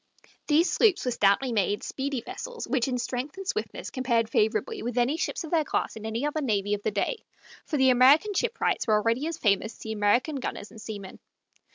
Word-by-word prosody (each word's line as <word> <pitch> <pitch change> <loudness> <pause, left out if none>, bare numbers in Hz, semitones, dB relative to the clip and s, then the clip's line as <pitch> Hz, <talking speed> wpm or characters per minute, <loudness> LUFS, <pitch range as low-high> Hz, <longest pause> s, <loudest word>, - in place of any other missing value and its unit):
These 320 +4 +3
sloops 420 - +3
were 250 - +1
stoutly 220 +4 +2
made, 205 -2 0
speedy 270 -2 -3
vessels 485 - -7
which 250 -1 +1
in 255 -1 -1
strength 250 +6 -4
and 390 -1 -7
swiftness 435 - -3
compared 235 -4 0
favorably 325 - 0
with 240 +1 -4
any 245 +5 +2
ships 335 - -2
of 320 - -8
their 325 -2 +3
class - - -2
in 220 0 -6
any 230 +5 -2
other 295 +1 -1
navy 205 -6 0
of 205 - -2
the - - 0
day, 210 - -2 0.4
for 300 - -1
the 265 -1 +5
American 280 +11 +5
shipwrights 470 - 0
were 215 - +4
already 230 +7 +1
as 330 -1 -4
famous 215 -2 +1
as - - -19
the 220 - -5
American 220 +8 +1
gunners 230 -5 -5
and 220 - -12
seamen. 205 -4 -8
250 Hz, 210 wpm, -27 LUFS, 220-300 Hz, 0.4 s, the